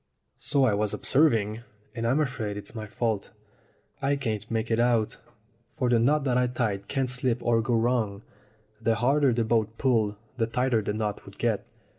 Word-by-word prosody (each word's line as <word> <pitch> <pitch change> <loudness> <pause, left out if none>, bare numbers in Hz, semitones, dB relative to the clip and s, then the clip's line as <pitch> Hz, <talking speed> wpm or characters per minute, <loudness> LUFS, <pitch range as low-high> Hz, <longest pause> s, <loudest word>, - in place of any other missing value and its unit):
"So 140 0 +2
I 110 - +3
was 105 0 0
observing, 115 -7 +2 0.3
and 115 -2 -2
I'm 130 +6 +2
afraid 115 -8 -2
it's 100 0 -8
my 110 -2 -6
fault. 110 -1 -2 0.7
I 140 +1 +2
can't 110 -5 -3
make 115 0 -2
it 115 - +2
out, 120 -3 +2 0.6
for 125 - 0
the 120 -1 +4
knot 145 +5 +3
that 125 -2 +2
I 125 - +2
tied 105 -5 -2
can't 135 -2 0
slip 125 -1 0
or 115 -1 +3
go 120 +1 0
wrong. 115 -3 0 0.6
The 115 0 +2
harder 135 +4 +3
the 115 0 +1
boat 110 0 0
pulled 110 -6 +2 0.2
the 115 -2 +1
tighter 125 -1 +1
the 105 0 -2
knot 105 -1 -3
would 100 - -12
get. 115 -3 -1
115 Hz, 185 wpm, -27 LUFS, 110-125 Hz, 0.7 s, the